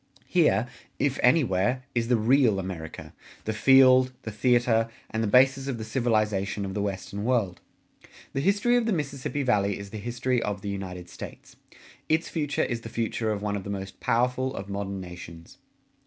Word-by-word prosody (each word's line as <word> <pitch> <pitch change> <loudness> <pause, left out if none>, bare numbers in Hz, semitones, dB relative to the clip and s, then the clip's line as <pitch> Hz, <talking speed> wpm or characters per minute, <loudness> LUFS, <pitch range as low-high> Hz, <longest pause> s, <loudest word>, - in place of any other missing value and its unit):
Here, - - +3 0.3
if 140 -2 0
anywhere, 125 - +2
is 115 -1 0
the 120 - +3
real 115 -1 +3
America 90 -4 -6 0.3
the 110 - -1
field, 130 +2 +6
the 110 - -5
theater, 115 0 +2 0.2
and 110 - -1
the 110 - 0
basis 135 +4 +4
of 130 -4 -2
the 110 - -5
civilization 110 -4 0
of 95 - -5
the 105 - -2
Western 100 0 -4
World. 110 -7 0 0.7
The 135 - -1
history 205 - +2
of 235 -1 0
the 225 - +2
Mississippi 145 -2 -3
Valley 100 -6 +1
is 100 -1 -9
the 110 - -6
history 120 +3 -1
of 100 -3 -3
the 100 - -3
United 90 -3 -6
States; - - -10 0.5
its 160 +1 +1
future 150 -3 -1
is 120 -2 -2
the 115 - -8
future 115 -1 -1
of 105 -1 -3
one 105 -1 -1
of 100 - -4
the 100 - -7
most 95 -1 -6
powerful 125 +2 0
of 95 +1 -6
modern 100 -1 -4
nations. 85 -2 -11
115 Hz, 180 wpm, -27 LUFS, 100-130 Hz, 0.7 s, field